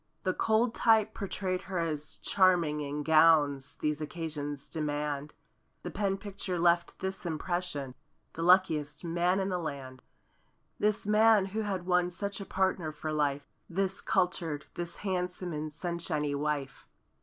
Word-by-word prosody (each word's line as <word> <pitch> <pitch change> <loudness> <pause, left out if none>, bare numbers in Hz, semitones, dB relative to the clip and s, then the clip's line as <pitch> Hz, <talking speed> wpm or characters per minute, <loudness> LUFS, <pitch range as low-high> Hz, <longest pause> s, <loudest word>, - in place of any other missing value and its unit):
The 185 - +1
cold 225 +2 +2
type 220 -2 +4
portrayed 185 -2 -2
her 190 - -2
as 155 -2 -3
charming 175 -6 +3
In 145 +1 -3
gowns 150 -3 +4
these 150 0 0
occasions 150 -3 -4
demand. 150 -2 -2 0.5
The - - -5
pen 195 -1 0
picture 195 -2 -4
left 170 0 +2
this 190 0 -4
impression; 165 -4 -2 0.4
"The 165 - -5
luckiest 165 -4 +3
man 175 +2 +1
in 190 0 0
the 180 -1 -1
land"— 135 -5 -6 0.8
This 210 -1 +1
man 215 -1 +5
who 220 - 0
had 195 -4 -3
won 180 -1 +3
such 200 +3 -4
a - - -5
partner 190 -4 0
for 155 +1 -4
life; 145 -2 0 0.2
This 195 +2 -1
cultured—this 170 -2 -1
handsome 180 -2 -2
and 155 0 -4
sunshiny 160 -3 -2
wife. 140 -2 -3
170 Hz, 140 wpm, -30 LUFS, 150-190 Hz, 0.8 s, man